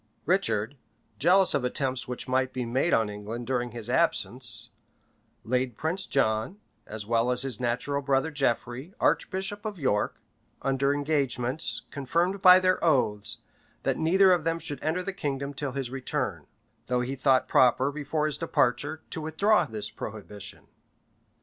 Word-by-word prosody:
Richard, 145 - +1 0.4
jealous 185 +4 +5
of 140 -3 +1
attempts 130 0 -1
which 125 -1 -4
might 130 0 +1
be 125 -1 -2
made 130 +8 0
on 110 -1 +3
England 105 +4 -6
during 125 -1 -1
his 115 -1 -8
absence, 120 -5 +1 0.7
laid 125 -1 -1
Prince 175 +5 -1
John, 110 - 0 0.3
as 110 -1 -6
well 115 +2 +1
as 125 0 +2
his 130 -5 -3
natural 125 +4 0
brother 135 +2 +1
Geoffrey, 135 - -2
archbishop 195 +2 0
of 215 -3 -4
York, 130 -9 0 0.4
under 135 +1 +1
engagements, 140 -1 0
confirmed 170 +8 0
by 185 0 +9
their 185 0 +1
oaths, 125 -10 +1 0.4
that - - 0
neither 185 +4 +5
of 175 -3 +1
them 165 +1 0
should 145 -5 -4
enter 170 +4 0
the 195 - -4
kingdom 140 -6 -3
till 140 -2 -4
his 135 -2 -3
return; 135 -1 -3 0.4
though 125 0 +1
he 130 +2 -3
thought 135 -1 +3
proper, 130 +2 +4
before 150 +1 -2
his 150 -2 -2
departure, 145 +6 0
to 160 - -3
withdraw 195 +8 +2
this 110 -5 -5
prohibition. 105 -2 -7
135 Hz, 150 wpm, -27 LUFS, 120-160 Hz, 0.7 s, by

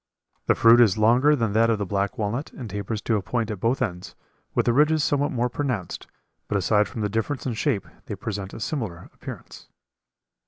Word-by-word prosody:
The - - +4
fruit 115 +1 +7
is 110 -4 +4
longer 125 +7 +4
than 115 -6 -1
that 115 +1 +4
of 115 - +2
the 100 - -2
black 100 +5 -2
walnut 115 +6 -2
and 125 - -7
tapers 105 +2 -4
to 110 - +1
a - - -2
point 115 +2 -2
at 105 - -5
both 120 +5 +1
ends, 90 -6 -5 0.4
with - - +2
the 120 - +3
ridges 150 +3 +3
somewhat 145 -1 +1
more 125 -1 0
pronounced, 125 - -3 0.4
but 100 - 0
aside 105 +2 +2
from 110 - -6
the 105 - +1
difference 115 +7 -2
in 125 - -1
shape 105 -2 -1 0.2
they - - -4
present 100 -3 -5
a - - -8
similar 110 - -4
appearance. - - -10
115 Hz, 205 wpm, -24 LUFS, 105-125 Hz, 0.4 s, fruit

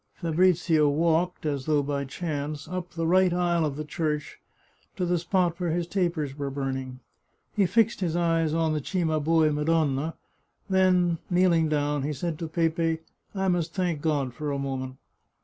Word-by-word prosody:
Fabrizio 165 -2 +3
walked, 165 +3 +1
as 140 -3 -2
though 150 -2 +3
by 140 0 -2
chance, 150 0 -4
up 180 0 -4
the 165 -1 -1
right 185 +2 +4
aisle 175 -1 +1
of 150 -3 -1
the 155 +1 -5
church 150 -1 -3 0.6
to 180 - -1
the 175 0 +1
spot 175 0 0
where 175 -2 -1
his 170 +1 0
tapers 170 -6 -1
were 140 -1 -3
burning. 130 -2 -4 0.6
He 200 -3 +3
fixed 225 +3 +2
his 170 -4 -1
eyes 165 -2 +1
on 160 0 +1
the 150 - -1
Cimabue 160 -2 +1
Madonna, 150 0 0 0.5
then, 185 -3 +3
kneeling 175 -3 +3
down, 145 -1 0
he 150 +3 -2
said 160 +3 -3
to 165 - -3
Pepe, 165 0 0 0.2
" - - -32
I 190 0 0
must 175 -2 0
thank 175 -6 -1
God 145 -5 0
for 150 +1 -4
a 140 - -1
moment." 130 -1 -4
160 Hz, 170 wpm, -26 LUFS, 150-175 Hz, 0.6 s, right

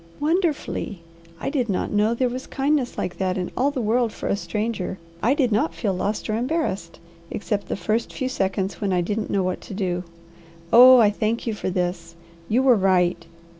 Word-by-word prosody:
"Wonderfully! 300 - -1 0.4
I - - -3
did 255 -6 -1
not 190 - -1
know 210 +3 +2
there 255 +1 +1
was 255 +2 -5
kindness 275 -2 0
like 180 - -4
that 185 -1 0
in 180 -1 -3
all 270 +3 +2
the 265 -4 -3
world 230 +1 +1
for - - -6
a - - +1
stranger. 210 -2 -3 0.2
I 255 +5 +3
did 260 -5 +1
not 170 -6 +1
feel 190 +4 -1
lost 200 +3 -2
or 215 - 0
embarrassed, 235 - -2 0.3
except 205 -1 -3
the - - -2
first 220 +3 -1
few 260 - -3
seconds 195 -4 -2
when 200 -2 0
I 180 - +2
didn't 210 +5 -2
know 195 -1 +1
what 185 0 -2
to 200 - -8
do. 180 -3 -1 0.7
Oh 255 +2 +10
I 215 -4 +5
thank 220 +2 -1
you 230 - -1
for 205 - -3
this! 175 -2 -3 0.3
You 245 +5 +3
were 260 -3 +6
right. 180 -3 +2
210 Hz, 200 wpm, -23 LUFS, 185-250 Hz, 0.7 s, Oh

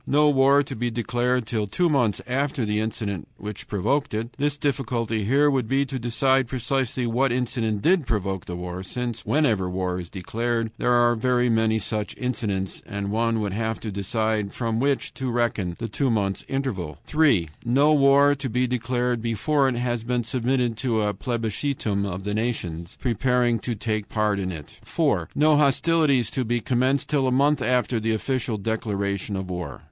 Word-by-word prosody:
No 150 +1 +4
war 140 +1 +5
to 135 -1 -7
be 120 +1 -1
declared 120 +1 0
till 110 -1 -2
two 175 - +1
months 125 - +1
after 130 0 -1
the 105 0 0
incident 105 -4 -3
which 105 0 -7
provoked 110 +7 0
it. 115 +3 -3
(The 145 +1 +2
difficulty 115 -6 -1
here 140 +6 +4
would 130 -4 0
be 135 +3 +2
to 135 -1 -4
decide 130 +2 +2
precisely 130 0 -1
what 125 +3 +1
incident 115 -4 -1
did 170 -6 +3
provoke 95 -5 -2
the 90 - -5
war, 90 +1 -5
since 120 +4 -4
whenever 110 -12 +2
war 90 0 -2
is 85 -2 -7
declared 115 +4 -2
there 125 - +2
are 120 0 +4
very 125 +1 +2
many 110 0 +2
such 105 -1 -3
incidents, 105 -7 -2
and 100 0 -4
one 115 0 +1
would 100 -2 -2
have 110 +1 -2
to 110 - -4
decide 105 +1 -1
from 115 -2 -1
which 140 +1 0
to 130 -1 -3
reckon 115 -7 0
the 115 - -4
two 135 +5 0
months' 100 -4 0
interval.) 105 - -3
3. 140 - +3
No 140 +6 +4
war 140 0 +5
to 140 -2 -4
be 125 +3 +1
declared 125 -1 -1
before 135 +5 +1
it 130 - -2
has 120 -1 -1
been 120 0 -1
submitted 125 0 0
to 115 -3 0
a 105 0 0
plebiscitum 110 -2 -2
of 95 0 -5
the 105 +1 -2
nations 90 -7 -3
preparing 120 0 +1
to 115 +4 -3
take 110 -1 -3
part 105 -2 +1
in 95 -1 -2
it. 75 -4 -10
4. - - 0
No 150 0 +4
hostilities 145 -3 +3
to 130 - -1
be 120 +1 0
commenced 130 +4 +1
till 140 -3 +1
a - - +1
month 140 +2 +3
after 125 -1 +1
the 110 0 0
official 120 -1 -2
declaration 100 -2 -2
of 95 -1 -4
war. 90 -7 -5
120 Hz, 185 wpm, -24 LUFS, 105-130 Hz, -, war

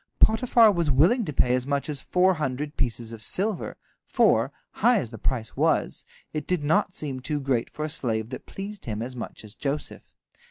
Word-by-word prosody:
Potiphar 225 0 +5
was 170 -5 0
willing 175 - +4
to 150 - -3
pay 125 -3 +2
as 125 +1 0
much 140 -1 0
as 145 -3 -2
four 185 +1 +3
hundred 150 -1 -3
pieces 120 -2 -2
of 110 - -9
silver, 200 - -1 0.3
for, - - +3 0.2
high 245 -1 +3
as 120 - -2
the 115 - -9
price 115 -2 -2
was, - - +1 0.3
it 155 -2 -4
did 180 -5 0
not 160 +5 +2
seem 140 -8 -4
too 145 +3 -2
great 130 -4 0
for 150 - -4
a - - -1
slave 115 -5 -2
that 130 - -7
pleased 200 +1 -7
him 110 -1 -3
as 125 +1 -6
much 120 - -7
as 105 - -9
Joseph. 140 +3 -5
145 Hz, 200 wpm, -26 LUFS, 125-180 Hz, 0.3 s, Potiphar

